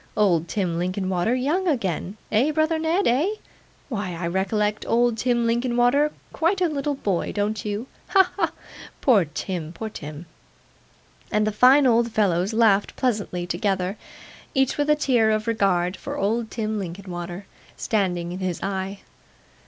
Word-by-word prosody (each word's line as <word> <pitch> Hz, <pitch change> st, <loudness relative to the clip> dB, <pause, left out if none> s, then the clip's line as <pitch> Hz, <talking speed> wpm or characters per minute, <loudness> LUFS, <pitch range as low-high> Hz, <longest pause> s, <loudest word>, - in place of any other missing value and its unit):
Old 175 Hz, -6 st, +3 dB
Tim 175 Hz, -5 st, -1 dB
Linkinwater 185 Hz, +4 st, 0 dB
young 305 Hz, +9 st, 0 dB
again! 200 Hz, -, -1 dB
Eh, 230 Hz, +7 st, +3 dB
brother 315 Hz, +1 st, +1 dB
Ned, 330 Hz, +5 st, +1 dB
eh? 300 Hz, -, +2 dB, 0.5 s
Why, 205 Hz, -, -3 dB
I 170 Hz, +1 st, -4 dB
recollect 210 Hz, +4 st, 0 dB
old 240 Hz, 0 st, +3 dB
Tim 240 Hz, +1 st, +1 dB
Linkinwater 245 Hz, +5 st, +2 dB, 0.2 s
quite 345 Hz, +4 st, +1 dB
a 360 Hz, -, +3 dB
little 290 Hz, -2 st, -2 dB
boy, 195 Hz, -9 st, -1 dB
don't 205 Hz, -1 st, -1 dB
you? 210 Hz, +2 st, -3 dB, 0.2 s
Ha, 385 Hz, -2 st, +6 dB
ha, -, -, +2 dB
ha! -, -, -14 dB, 0.5 s
Poor 220 Hz, -10 st, +4 dB
Tim, 160 Hz, +2 st, -5 dB
poor 220 Hz, +6 st, -6 dB
Tim!' 150 Hz, -2 st, -8 dB, 1.1 s
And 210 Hz, 0 st, +2 dB
the 215 Hz, -, +1 dB
fine 255 Hz, +6 st, +6 dB
old 235 Hz, -1 st, +3 dB
fellows 195 Hz, -2 st, +1 dB
laughed 220 Hz, -3 st, +3 dB
pleasantly 205 Hz, -8 st, -1 dB
together: 185 Hz, +1 st, -1 dB, 0.6 s
each 270 Hz, -1 st, +2 dB
with 290 Hz, 0 st, 0 dB
a 300 Hz, -, +6 dB
tear 250 Hz, -7 st, +2 dB
of 215 Hz, 0 st, 0 dB
regard 195 Hz, -5 st, +1 dB
for -, -, -6 dB
old 220 Hz, +3 st, 0 dB
Tim 215 Hz, -2 st, -2 dB
Linkinwater 175 Hz, 0 st, -6 dB, 0.3 s
standing 180 Hz, -5 st, -1 dB
in 180 Hz, -, -5 dB
his 185 Hz, -3 st, -2 dB
eye. 195 Hz, 0 st, -3 dB
210 Hz, 150 wpm, -24 LUFS, 185-245 Hz, 1.1 s, Ha